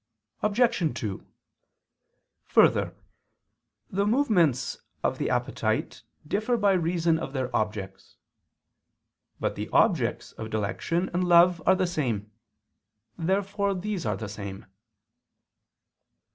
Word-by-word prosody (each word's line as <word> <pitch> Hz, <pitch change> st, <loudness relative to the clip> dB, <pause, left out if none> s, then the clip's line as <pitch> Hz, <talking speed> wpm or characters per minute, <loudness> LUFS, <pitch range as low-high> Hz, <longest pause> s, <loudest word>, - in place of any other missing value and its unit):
Obj. 210 Hz, -, +2 dB
2: 100 Hz, -4 st, -5 dB, 1.2 s
Further, -, -, +4 dB, 1.0 s
the 200 Hz, +2 st, +1 dB
movements 205 Hz, -, +2 dB, 0.2 s
of -, -, 0 dB
the -, -, 0 dB
appetite -, -, -1 dB, 0.3 s
differ 220 Hz, +8 st, 0 dB
by 205 Hz, -3 st, +3 dB
reason 170 Hz, -2 st, +1 dB
of 140 Hz, -, -5 dB
their 130 Hz, -3 st, -2 dB
objects. 105 Hz, -3 st, -3 dB, 1.2 s
But -, -, -1 dB
the -, -, -5 dB
objects -, -, +2 dB
of 110 Hz, 0 st, -7 dB
dilection 110 Hz, -, -1 dB
and 180 Hz, +1 st, +1 dB
love 175 Hz, 0 st, +6 dB
are 190 Hz, -, +6 dB
the 185 Hz, 0 st, +1 dB
same. 120 Hz, -, -2 dB, 0.8 s
Therefore 195 Hz, +3 st, 0 dB
these 190 Hz, 0 st, -3 dB
are 105 Hz, -3 st, -1 dB
the 110 Hz, -, -5 dB
same. 100 Hz, -1 st, -7 dB
170 Hz, 105 wpm, -27 LUFS, -, 1.2 s, love